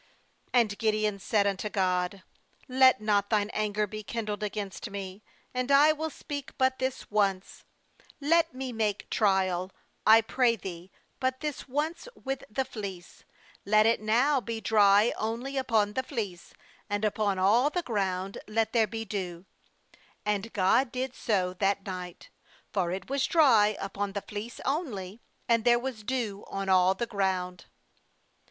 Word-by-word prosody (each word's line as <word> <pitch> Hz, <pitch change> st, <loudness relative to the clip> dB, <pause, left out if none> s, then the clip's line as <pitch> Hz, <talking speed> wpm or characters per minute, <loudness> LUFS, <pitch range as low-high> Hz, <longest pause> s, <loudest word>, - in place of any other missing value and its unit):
39And 220 Hz, -4 st, +3 dB
Gid 215 Hz, -1 st, +2 dB
eon 210 Hz, -2 st, -1 dB
said 200 Hz, +1 st, +1 dB
unto 200 Hz, +1 st, -1 dB
God: 185 Hz, -1 st, 0 dB, 0.4 s
'Let 260 Hz, -2 st, +5 dB
not 205 Hz, -1 st, +1 dB
Thine 210 Hz, -1 st, +1 dB
anger 210 Hz, 0 st, 0 dB
be 215 Hz, +1 st, -7 dB
kindled 215 Hz, -1 st, -4 dB
against 205 Hz, -1 st, -4 dB
me, 195 Hz, 0 st, -7 dB, 0.3 s
and 255 Hz, +1 st, -2 dB
I 290 Hz, +2 st, +7 dB
will 315 Hz, +1 st, -3 dB
speak 285 Hz, -2 st, -7 dB
but 260 Hz, 0 st, +2 dB
this 260 Hz, -3 st, -3 dB
once: 195 Hz, -2 st, 0 dB, 0.5 s
let 330 Hz, +3 st, +3 dB
me 260 Hz, -2 st, -5 dB
make 215 Hz, -3 st, -2 dB
trial, 190 Hz, -3 st, +1 dB, 0.3 s
I 220 Hz, +1 st, +7 dB
pray 235 Hz, +1 st, +2 dB
Thee, 180 Hz, -3 st, -8 dB, 0.3 s
but 260 Hz, 0 st, -1 dB
this 300 Hz, -4 st, -4 dB
once 310 Hz, -, -2 dB
with 270 Hz, 0 st, -4 dB
the 260 Hz, +5 st, -1 dB
fleece; 195 Hz, -8 st, -8 dB, 0.4 s
let 215 Hz, +1 st, +4 dB
it 225 Hz, -1 st, +3 dB
now 250 Hz, +6 st, +3 dB
be 230 Hz, -1 st, -4 dB
dry 210 Hz, 0 st, +4 dB
only 235 Hz, +5 st, -3 dB
upon 225 Hz, -6 st, +1 dB
the 260 Hz, -, 0 dB
fleece, 205 Hz, -8 st, -5 dB, 0.4 s
and 205 Hz, +1 st, 0 dB
upon 205 Hz, -2 st, 0 dB
all 220 Hz, +9 st, +4 dB
the 355 Hz, +3 st, -2 dB
ground 195 Hz, -, -2 dB
let 220 Hz, +1 st, 0 dB
there 225 Hz, -3 st, +3 dB
be 225 Hz, +2 st, -5 dB
dew/ 185 Hz, -4 st, -5 dB, 0.8 s
40And 210 Hz, +1 st, -1 dB
God 225 Hz, +6 st, +2 dB
did 255 Hz, 0 st, -3 dB
so 185 Hz, -7 st, 0 dB
that 195 Hz, +1 st, 0 dB
night; 180 Hz, -2 st, -7 dB, 0.4 s
for 185 Hz, -4 st, +1 dB
it 190 Hz, +2 st, -5 dB
was 275 Hz, 0 st, 0 dB
dry 225 Hz, -10 st, +5 dB
upon 200 Hz, 0 st, -3 dB
the 200 Hz, -1 st, -4 dB
fleece 215 Hz, +3 st, -7 dB
only, 240 Hz, -, -3 dB, 0.3 s
and 230 Hz, -1 st, +3 dB
there 240 Hz, -1 st, +5 dB
was 245 Hz, -2 st, -4 dB
dew 215 Hz, -4 st, -3 dB
on 195 Hz, 0 st, -4 dB
all 185 Hz, 0 st, +4 dB
the 235 Hz, -, -2 dB
ground. 185 Hz, -4 st, -2 dB
215 Hz, 155 wpm, -28 LUFS, 195-250 Hz, 0.8 s, I